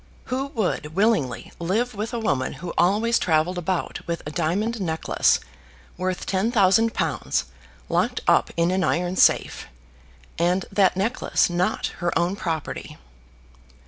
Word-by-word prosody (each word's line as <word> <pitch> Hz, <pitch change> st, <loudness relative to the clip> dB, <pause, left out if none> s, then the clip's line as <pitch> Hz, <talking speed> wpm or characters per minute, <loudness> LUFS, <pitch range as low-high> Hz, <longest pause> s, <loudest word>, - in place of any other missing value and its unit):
Who 270 Hz, +2 st, -1 dB
would 175 Hz, -7 st, -2 dB
willingly 195 Hz, -, +1 dB
live 220 Hz, +9 st, 0 dB
with 215 Hz, +2 st, -4 dB
a 240 Hz, -, -3 dB
woman 140 Hz, -, 0 dB
who 170 Hz, +5 st, -7 dB
always 215 Hz, +6 st, +3 dB
travelled 165 Hz, +2 st, +1 dB
about 175 Hz, +1 st, -2 dB
with 170 Hz, -1 st, -3 dB
a 150 Hz, -, -5 dB
diamond 195 Hz, +8 st, -1 dB
necklace 160 Hz, -3 st, +1 dB, 0.6 s
worth 185 Hz, 0 st, -3 dB
ten 195 Hz, +4 st, 0 dB
thousand 225 Hz, +1 st, +3 dB
pounds, 155 Hz, -, -1 dB, 0.4 s
locked -, -, 0 dB
up -, -, +4 dB
in 170 Hz, +1 st, +2 dB
an 185 Hz, 0 st, +1 dB
iron 175 Hz, +2 st, 0 dB
safe, -, -, +3 dB, 0.7 s
and 180 Hz, +3 st, +1 dB
that 195 Hz, -2 st, +3 dB
necklace 210 Hz, -2 st, +1 dB
not 175 Hz, +1 st, -1 dB
her 175 Hz, -1 st, 0 dB
own 175 Hz, +3 st, +1 dB
property. 165 Hz, -6 st, -4 dB
185 Hz, 140 wpm, -24 LUFS, 170-210 Hz, 0.7 s, up